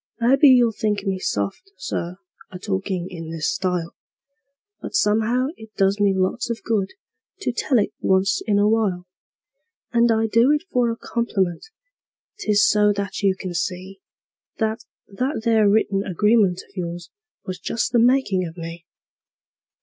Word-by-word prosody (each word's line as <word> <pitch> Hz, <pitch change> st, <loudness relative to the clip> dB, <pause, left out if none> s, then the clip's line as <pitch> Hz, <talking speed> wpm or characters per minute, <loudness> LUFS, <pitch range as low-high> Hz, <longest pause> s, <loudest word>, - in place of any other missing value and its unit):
Maybe 270 Hz, +5 st, +5 dB
you'll 245 Hz, -3 st, +6 dB
think 210 Hz, -2 st, -2 dB
me 190 Hz, -1 st, -1 dB
soft, 100 Hz, -, -3 dB
Sir, 180 Hz, -, -4 dB, 0.3 s
a 185 Hz, -, -7 dB
talkin' 190 Hz, -2 st, -3 dB
in 165 Hz, -3 st, -7 dB
this 165 Hz, -2 st, -2 dB
style, 180 Hz, -4 st, -2 dB, 0.9 s
But -, -, -6 dB
somehow 235 Hz, -, +2 dB
it 220 Hz, -1 st, -14 dB
does 195 Hz, +1 st, +2 dB
me 205 Hz, -1 st, +3 dB
lots 190 Hz, +6 st, -1 dB
of 230 Hz, -3 st, -4 dB
good 205 Hz, -4 st, -1 dB, 0.5 s
to 395 Hz, -, -1 dB
tell 250 Hz, +2 st, +1 dB
it 210 Hz, -1 st, 0 dB
once 190 Hz, +1 st, +2 dB
in 205 Hz, -2 st, +2 dB
a 205 Hz, +1 st, +3 dB
while; 210 Hz, -5 st, 0 dB, 0.9 s
And 235 Hz, 0 st, +4 dB
I 225 Hz, 0 st, +2 dB
do 230 Hz, +5 st, +3 dB
it 300 Hz, -, 0 dB
for 245 Hz, -2 st, +2 dB
a 230 Hz, -, -3 dB
compliment 200 Hz, -, -2 dB, 0.7 s
'tis 210 Hz, -, +3 dB
so 210 Hz, 0 st, +4 dB
that 200 Hz, 0 st, -4 dB
you 195 Hz, -2 st, +2 dB
can 185 Hz, -1 st, -6 dB
see 185 Hz, +2 st, -4 dB, 0.6 s
That 220 Hz, 0 st, -1 dB, 0.2 s
that 250 Hz, +4 st, -3 dB
there 220 Hz, -3 st, +4 dB
written 200 Hz, -2 st, +2 dB
agreement 200 Hz, -1 st, +2 dB
of -, -, -28 dB
yours 175 Hz, -1 st, -5 dB, 0.3 s
was 185 Hz, -1 st, -5 dB
just 230 Hz, -, -2 dB
the 240 Hz, -, +3 dB
makin' 235 Hz, -6 st, +3 dB
of 165 Hz, +2 st, -11 dB
me. 165 Hz, 0 st, -8 dB
205 Hz, 155 wpm, -22 LUFS, 185-230 Hz, 0.9 s, you'll